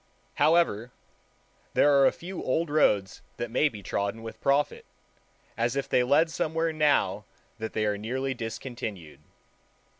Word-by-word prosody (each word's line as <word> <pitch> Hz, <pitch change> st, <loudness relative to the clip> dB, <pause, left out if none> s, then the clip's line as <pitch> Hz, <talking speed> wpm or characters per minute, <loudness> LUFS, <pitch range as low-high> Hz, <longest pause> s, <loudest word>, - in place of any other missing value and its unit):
However, 150 Hz, -8 st, +3 dB, 0.9 s
there 145 Hz, -, +5 dB
are 140 Hz, -1 st, +6 dB
a -, -, +3 dB
few 180 Hz, +2 st, -7 dB
old 155 Hz, +4 st, -1 dB
roads 105 Hz, -11 st, +2 dB, 0.2 s
that 120 Hz, -1 st, -4 dB
may 145 Hz, +5 st, +3 dB
be 105 Hz, -6 st, -11 dB
trodden 100 Hz, +4 st, -2 dB
with 115 Hz, -, -9 dB
profit, 140 Hz, +1 st, +1 dB, 0.7 s
as 120 Hz, +2 st, 0 dB
if 140 Hz, -, -2 dB
they -, -, +3 dB
led 145 Hz, +6 st, +3 dB
somewhere 160 Hz, +1 st, -1 dB
now 140 Hz, -10 st, +2 dB, 0.4 s
that 110 Hz, 0 st, -5 dB
they 110 Hz, -, 0 dB
are 105 Hz, -1 st, -1 dB
nearly 130 Hz, +5 st, -2 dB
discontinued. 115 Hz, -, -6 dB
125 Hz, 145 wpm, -27 LUFS, 110-150 Hz, 0.9 s, are